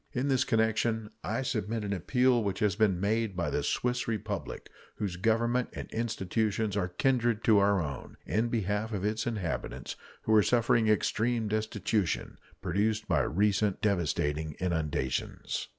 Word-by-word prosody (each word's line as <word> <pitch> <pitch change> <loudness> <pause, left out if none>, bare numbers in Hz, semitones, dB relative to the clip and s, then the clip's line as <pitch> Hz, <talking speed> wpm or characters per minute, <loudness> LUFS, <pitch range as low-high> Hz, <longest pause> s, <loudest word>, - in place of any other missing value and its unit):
In 130 +3 0
this 130 -1 +3
connection 110 -1 +1
I 115 +5 -1
submit 110 -3 -2
an 100 -1 -2
appeal 125 +6 +2
which 100 -2 -1
has 105 -4 +1
been 100 -4 +2
made 105 0 0
by 85 - -1
the - - 0
Swiss 125 0 -1
Republic, 105 -7 -4 0.3
whose 100 -4 -3
Government 115 +5 +1
and - - -7
institutions 110 -1 -1
are 95 -3 0
kindred 120 +3 +1
to 110 -3 +5
our 100 0 +3
own, 75 -5 -5
in 110 +2 +1
behalf 110 0 -1
of 100 -1 -2
its 110 +2 -1
inhabitants, 100 -9 -3 0.3
who 110 - +1
are 110 - +7
suffering 115 0 +3
extreme 110 +2 +1
destitution, 110 -2 -1 0.2
produced 105 +4 0
by - - +3
recent 100 +2 +1
devastating 80 -5 0
inundations. 80 -7 -2
105 Hz, 150 wpm, -30 LUFS, 95-115 Hz, 0.3 s, are